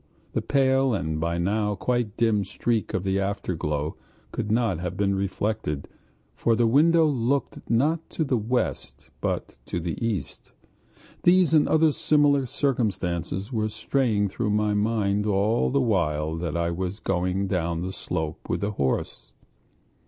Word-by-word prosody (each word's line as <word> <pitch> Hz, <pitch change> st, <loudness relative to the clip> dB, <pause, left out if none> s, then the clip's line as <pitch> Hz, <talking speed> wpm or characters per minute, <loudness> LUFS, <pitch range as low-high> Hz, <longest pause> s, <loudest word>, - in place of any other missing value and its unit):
The -, -, 0 dB
pale 135 Hz, -2 st, +2 dB
and, 80 Hz, -4 st, -2 dB
by 85 Hz, +1 st, -1 dB
now, 105 Hz, +4 st, 0 dB
quite 120 Hz, 0 st, -1 dB
dim 110 Hz, -3 st, +2 dB
streak 105 Hz, +4 st, -1 dB
of 95 Hz, -, -1 dB
the 95 Hz, 0 st, 0 dB
afterglow 80 Hz, -6 st, -2 dB, 0.3 s
could 105 Hz, -, -3 dB
not 110 Hz, -6 st, +1 dB
have 90 Hz, 0 st, -4 dB
been 100 Hz, -1 st, +1 dB
reflected, 95 Hz, -5 st, -2 dB, 0.5 s
for 115 Hz, -, +1 dB
the 120 Hz, +1 st, +3 dB
window 160 Hz, +7 st, +5 dB
looked 140 Hz, -1 st, -1 dB
not 150 Hz, +8 st, +1 dB
to 160 Hz, -, -1 dB
the 135 Hz, -4 st, 0 dB
west, 120 Hz, +4 st, -3 dB
but -, -, -3 dB
to -, -, -2 dB
the 85 Hz, +6 st, -4 dB
east. 100 Hz, -11 st, -4 dB, 0.7 s
These 175 Hz, -2 st, +4 dB
and 155 Hz, -2 st, +5 dB
other 160 Hz, 0 st, +4 dB
similar 145 Hz, -2 st, +3 dB
considerations 100 Hz, -, -1 dB
were 110 Hz, -1 st, 0 dB
straying 110 Hz, -2 st, 0 dB
through 105 Hz, +3 st, -2 dB
my 105 Hz, 0 st, +1 dB
mind 105 Hz, -1 st, +1 dB
all 105 Hz, +3 st, +2 dB
the 140 Hz, -, +2 dB
while 80 Hz, -9 st, 0 dB
that 85 Hz, -1 st, -3 dB
I 85 Hz, 0 st, 0 dB
was 95 Hz, +3 st, -3 dB
going 90 Hz, +1 st, 0 dB
down 85 Hz, -3 st, -1 dB
the 95 Hz, +1 st, -4 dB
slope 80 Hz, -3 st, -4 dB
with -, -, -1 dB
the 100 Hz, +1 st, -1 dB
horse. 65 Hz, -7 st, -2 dB
105 Hz, 150 wpm, -25 LUFS, 90-120 Hz, 0.7 s, window